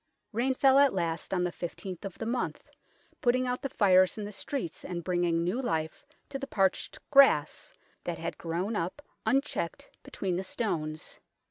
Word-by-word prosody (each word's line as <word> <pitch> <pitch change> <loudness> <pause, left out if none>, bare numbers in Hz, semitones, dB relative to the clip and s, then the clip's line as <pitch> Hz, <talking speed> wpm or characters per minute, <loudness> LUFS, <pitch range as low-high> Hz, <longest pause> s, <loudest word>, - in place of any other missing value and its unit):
Rain 250 +4 +1
fell 270 +1 +6
at 280 -2 +5
last 170 -3 -2
on 180 -2 +1
the 180 - 0
I5th 180 +2 -6
of 195 - -6
the 225 - -4
month, 245 +2 -2 0.5
putting 255 +1 +3
out 250 0 -1
the 275 - -2
fires 185 -4 +4
in 210 - -3
the 205 - -6
streets 210 - -4
and 175 -2 -4
bringing 175 -1 +1
new 185 +9 0
life 160 - -2 0.2
to 275 - -4
the 275 - -5
parched 195 -6 +1
grass 270 - +5 0.3
that - - -3
had - - -4
grown 175 +6 -2
up 185 - -3 0.2
un 270 +1 +5
checked 170 -10 -5
between 185 -3 -3
the 190 - -2
stones. 155 -8 -3
190 Hz, 175 wpm, -30 LUFS, 170-250 Hz, 0.5 s, fell